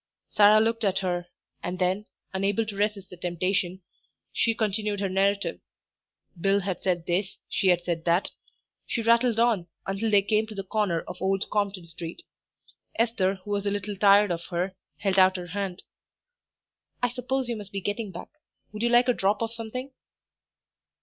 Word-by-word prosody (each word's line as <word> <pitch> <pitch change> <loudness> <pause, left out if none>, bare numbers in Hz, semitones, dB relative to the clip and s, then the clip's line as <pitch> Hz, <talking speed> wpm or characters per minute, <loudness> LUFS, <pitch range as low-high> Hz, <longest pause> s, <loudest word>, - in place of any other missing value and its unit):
Sarah 210 +1 +6
looked 230 +1 +1
at 195 -2 +2
her, 175 -2 -2 0.3
and 180 +1 -3
then, 185 +3 0 0.3
unable 195 +3 +1
to 215 -2 -6
resist 205 -2 -1
the 180 - -9
temptation, 180 +1 -1 0.5
she 230 -1 +2
continued 210 -1 -1
her 195 -1 0
narrative 195 +2 +1 0.8
Bill 195 +3 +3
had 185 -1 -3
said 175 -3 0
this, 185 +3 -1
she 195 - 0
had 175 -1 +4
said 170 -2 -2
that. 175 +2 +2 0.6
She 230 - -1
rattled 230 0 +4
on, 225 -7 +2 0.2
until 195 +3 -1
they 205 -2 +5
came 215 +1 +1
to 215 - -8
the 195 - -4
corner 190 -4 0
of 180 - -9
Old 195 +1 +1
Compton 200 -4 -1
Street. 165 - -8 0.7
Esther, 215 -5 +1
who 205 - -5
was 205 0 0
a - - +1
little 205 0 -3
tired 200 0 +5
of 170 0 -3
her, 180 +2 -2 0.2
held 195 -1 +1
out 185 0 +6
her 180 - -5
hand. 195 0 -4 1.2
"I 245 - +4
suppose 255 +1 -2
you 235 - -1
must 205 -3 -8
be 200 - -2
getting 205 +3 -3
back; 175 0 -8 0.4
would 210 0 -6
you 235 - +2
like 240 +1 +5
a 250 - +4
drop 205 +1 +1
of 225 0 -3
something?" 235 +4 -5
200 Hz, 175 wpm, -27 LUFS, 185-215 Hz, 1.2 s, Sarah